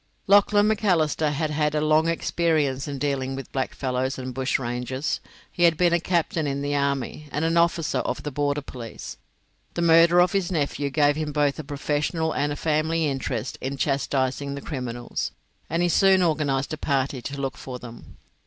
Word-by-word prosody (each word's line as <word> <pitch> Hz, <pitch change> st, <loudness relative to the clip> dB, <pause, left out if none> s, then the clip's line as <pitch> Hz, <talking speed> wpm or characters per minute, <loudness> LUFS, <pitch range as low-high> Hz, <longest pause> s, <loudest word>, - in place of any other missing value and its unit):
Lachlan 205 Hz, +1 st, +5 dB
Macalister 175 Hz, -8 st, +2 dB
had 150 Hz, +1 st, -1 dB
had 150 Hz, 0 st, 0 dB
a -, -, +2 dB
long 155 Hz, +1 st, +3 dB
experience 155 Hz, -5 st, 0 dB
in 140 Hz, -1 st, -4 dB
dealing 135 Hz, -1 st, -1 dB
with 135 Hz, -, -8 dB
blackfellows 130 Hz, 0 st, -2 dB
and 130 Hz, -1 st, -5 dB
bushrangers; 130 Hz, +1 st, -2 dB, 0.3 s
he -, -, -6 dB
had 170 Hz, -2 st, +5 dB
been 175 Hz, -1 st, +3 dB
a 170 Hz, -, +3 dB
captain 170 Hz, -3 st, 0 dB
in 140 Hz, 0 st, -2 dB
the 145 Hz, 0 st, -1 dB
army, 140 Hz, +1 st, -1 dB
and 150 Hz, +3 st, -1 dB
an 165 Hz, +1 st, +1 dB
officer 170 Hz, -1 st, +2 dB
of -, -, -3 dB
the 150 Hz, -, -4 dB
border 145 Hz, 0 st, -1 dB
police. 120 Hz, -4 st, -8 dB, 0.6 s
The 170 Hz, -, 0 dB
murder 170 Hz, +1 st, +6 dB
of 180 Hz, 0 st, +4 dB
his 195 Hz, -2 st, 0 dB
nephew 145 Hz, -3 st, -1 dB
gave 145 Hz, +1 st, +2 dB
him 155 Hz, -1 st, -2 dB
both 145 Hz, -1 st, +1 dB
a -, -, -4 dB
professional 150 Hz, +3 st, -1 dB
and 145 Hz, +1 st, 0 dB
a -, -, -2 dB
family 160 Hz, +2 st, 0 dB
interest 130 Hz, -4 st, -3 dB
in 135 Hz, +1 st, -3 dB
chastising 140 Hz, 0 st, -1 dB
the 140 Hz, -, -6 dB
criminals, 125 Hz, -5 st, -4 dB, 0.4 s
and 170 Hz, +1 st, 0 dB
he 175 Hz, -, +2 dB
soon 190 Hz, +1 st, +5 dB
organised 145 Hz, -4 st, 0 dB
a -, -, -3 dB
party 135 Hz, -2 st, -1 dB
to 140 Hz, +3 st, -6 dB
look 135 Hz, -1 st, -2 dB
for 130 Hz, -1 st, -7 dB
them. 120 Hz, -1 st, -12 dB
145 Hz, 180 wpm, -25 LUFS, 135-165 Hz, 0.6 s, murder